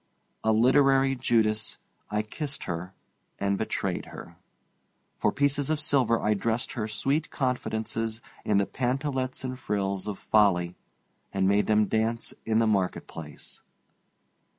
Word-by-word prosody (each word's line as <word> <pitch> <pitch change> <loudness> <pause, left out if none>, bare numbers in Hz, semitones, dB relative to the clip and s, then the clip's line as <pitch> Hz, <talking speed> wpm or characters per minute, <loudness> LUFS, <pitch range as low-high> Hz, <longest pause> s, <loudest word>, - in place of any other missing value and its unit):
A 110 - +3
literary 135 +4 +4
Judas, 110 -3 +1 0.3
I 105 0 0
kissed 145 +6 -5
her 90 +2 -5 0.4
and 100 0 +1
betrayed - - -2
her. - - -10 0.8
For - - +2
pieces 145 0 +1
of 155 -1 +1
silver 130 -6 +2
I 105 - +2
dressed 115 +4 -1
her 110 -3 -3
sweet 140 +7 0
confidences 115 -4 -2 0.2
in 105 - +2
the 100 - +3
pantalettes 130 +1 -2
and 130 0 -4
frills 100 -3 -2
of 105 -2 -3
folly 90 -5 +3 0.6
and 95 -1 +1
made 100 +1 +3
them 105 0 +4
dance 110 +2 0
in 110 -1 +2
the 115 - +4
market 100 -4 +1
place. 75 -3 -10
110 Hz, 135 wpm, -27 LUFS, 105-130 Hz, 0.8 s, literary